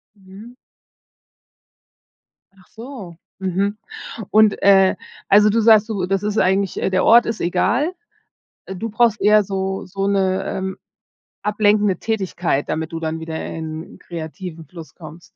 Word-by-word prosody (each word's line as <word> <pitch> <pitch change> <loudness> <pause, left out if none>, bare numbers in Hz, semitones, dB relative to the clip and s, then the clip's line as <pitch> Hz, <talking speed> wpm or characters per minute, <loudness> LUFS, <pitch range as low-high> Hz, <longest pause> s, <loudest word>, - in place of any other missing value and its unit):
Mhm. 200 +5 -14 2.0
Ach 185 - -22
so, 225 -8 -10 0.2
mhm. 195 +3 -1 0.5
Und, 215 -1 +4
äh, 195 -1 +5 0.3
also 210 +1 +6
du 230 +2 +2
sagst: 220 -1 +5
„Du 195 -5 -2
das 195 +1 -1
ist 210 +1 -2
eigentlich 190 0 +1
der 185 -1 0
Ort 235 +1 +6
ist 230 - -3
egal. 210 - 0 0.7
Du 190 +4 -5
brauchst 220 0 +1
eher 210 0 +5
so 190 0 -3
so 195 +1 -3
'ne, 190 -2 +1
ähm, 190 0 -4 0.7
ablenkende 210 -2 +2
Tätigkeit 185 -9 -2
damit 160 +1 -3
du 165 - -4
dann 160 0 -3
wieder 160 0 -5
in 160 0 -7
kreativen 165 0 -8
Fluss 165 +1 -12
kommst?" 165 0 -12
195 Hz, 135 wpm, -20 LUFS, 180-210 Hz, 2.0 s, also